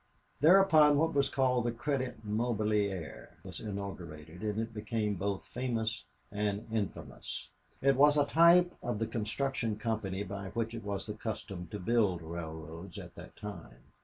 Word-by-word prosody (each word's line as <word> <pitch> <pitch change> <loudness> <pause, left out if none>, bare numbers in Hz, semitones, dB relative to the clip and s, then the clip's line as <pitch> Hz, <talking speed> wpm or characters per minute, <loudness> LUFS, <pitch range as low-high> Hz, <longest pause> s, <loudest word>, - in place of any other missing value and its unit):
Thereupon 155 -3 +7
what 160 +2 +2
was 140 -1 +3
called 125 -3 +2
the 120 - +1
Credit 125 -2 -2
Mobilier 105 -5 -1
was - - -7
inaugurated, 90 -6 -6
and 105 0 -1
it 115 0 -3
became 105 0 -1
both 100 +1 -2
famous 115 -3 -2 0.3
and 105 0 -1
infamous. 105 - -4 0.3
It 135 0 +5
was 145 +2 +6
a 145 - +5
type 170 +3 +6
of 120 -3 -2
the 115 - 0
construction 115 +1 -1
company 105 -3 -2
by 100 0 -5
which 115 0 -1
it 115 - -6
was 100 -1 -3
the 105 - -4
custom 100 -5 -5
to 105 - -5
build 100 -4 +2
railroads 80 +1 -7
at - - -8
that - - -11
time. 85 -12 -9
110 Hz, 155 wpm, -32 LUFS, 100-125 Hz, 0.3 s, Thereupon